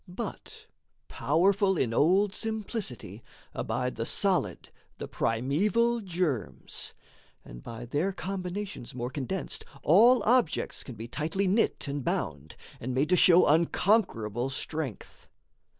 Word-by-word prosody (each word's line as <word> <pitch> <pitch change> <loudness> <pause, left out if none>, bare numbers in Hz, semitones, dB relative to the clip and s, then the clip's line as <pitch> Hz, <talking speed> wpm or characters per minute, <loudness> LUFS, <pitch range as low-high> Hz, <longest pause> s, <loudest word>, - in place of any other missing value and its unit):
But 180 - -7 0.4
powerful 190 +5 +2
in 115 -6 0
old 190 - +3
simplicity, 210 - -4 0.3
Abide 125 +1 -2
the 115 - -2
solid, 195 -3 0 0.3
the - - -6
primeval 200 - +1
germs; 170 - -2 0.5
And - - -10
by 115 - -8
their 150 +10 0
combinations 190 - -5
more 120 0 -4
condensed, 145 +7 -3 0.2
All 235 +10 +6
objects 240 -8 +1
can 125 - -9
be 110 +2 -7
tightly 165 +9 -1
knit 200 -4 +1
and 140 -1 -3
bound 75 - -3 0.2
And 125 +1 -4
made 140 +4 +1
to 180 - +5
show 180 0 +6
unconquerable 150 - +2
strength. 140 -3 -6
165 Hz, 120 wpm, -28 LUFS, 125-195 Hz, 0.5 s, All